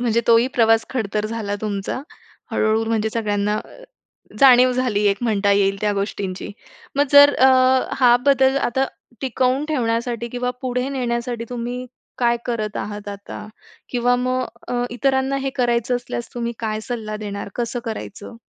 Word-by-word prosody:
म्हणजे 235 -1 +2
तोही 230 +1 +5
प्रवास 225 -1 +4
खडतर 215 -4 -2
झाला 215 -2 -3
तुमचा. 205 +2 -3 0.5
हळू-हळू 220 +1 +1
म्हणजे 220 -1 0
सगळ्यांना 210 -2 -1 0.8
जाणीव 255 -1 +7
झाली 245 -5 0
एक 200 - +1
म्हणता 205 -3 +1
येईल, 195 0 +2
त्या 210 -1 +1
गोष्टींची. 195 -1 -4 0.5
मग 285 - +4
जर 285 0 +8
अ, 260 - +5 0.5
हा 245 -1 +7
बदल 270 -1 +4
आता 265 0 +1 0.3
टिकवून 260 +2 0
ठेवण्यासाठी 235 -3 -1
किंवा 250 +1 -2
पुढे 250 0 -1
नेण्यासाठी 240 -3 -2
तुम्ही 245 +1 -4 0.3
काय 240 -1 +3
करत 215 -3 -2
आहात 205 -1 -5
आता? 200 +1 -8 0.4
किंवा 245 0 +1
मग 255 +1 0 0.3
अ, - - -3
अ, 245 0 0
इतरांना 265 +2 0
हे 270 0 -2
करायचं 240 0 +1
असल्यास 240 -1 -6
तुम्ही 235 -1 -2
काय 215 -1 -2
सल्ला 220 -4 -4
देणार? 200 -1 -6
कसं 240 0 -2
करायचं? 220 0 -7
235 Hz, 150 wpm, -21 LUFS, 215-250 Hz, 0.8 s, जर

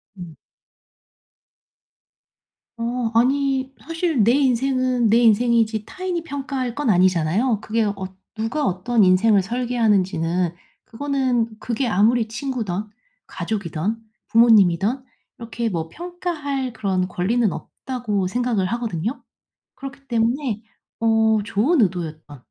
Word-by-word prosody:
음. 175 -5 -10 2.4
어 235 0 -2
아니 265 +2 +1
사실 330 - 0
내 235 - +4
인생은 255 -2 +2
내 225 - +5
인생이지 230 -1 +3
타인이 370 -2 -4
평가할 270 -4 -4
건 290 -6 +1
아니잖아요. 185 +5 +2
그게 220 +2 -1
어 205 -1 -1 0.4
'누가 235 +7 -1
어떤 205 +5 +1
인생을 195 +3 +4
설계하는지는 190 -7 0 0.3
그거는 255 -2 -1
그게 245 +2 -2
아무리 220 +3 +3
친구든 225 -5 -3 0.4
가족이든 200 0 -3 0.3
부모님이든 225 +1 +4 0.4
이렇게 230 0 -3
뭐 165 -4 -3
평가할 310 - -4
그런 185 -3 -1
권리는 205 +5 0
없다.'고 220 -6 -3
생각을 230 -2 0
하거든요. 225 - -3 0.5
그렇기 275 0 -10
때문에 235 -1 0 0.4
어 220 -1 +3
좋은 245 - +2
의도였든 160 -6 -3
230 Hz, 260 characters per minute, -22 LUFS, 200-255 Hz, 2.4 s, 내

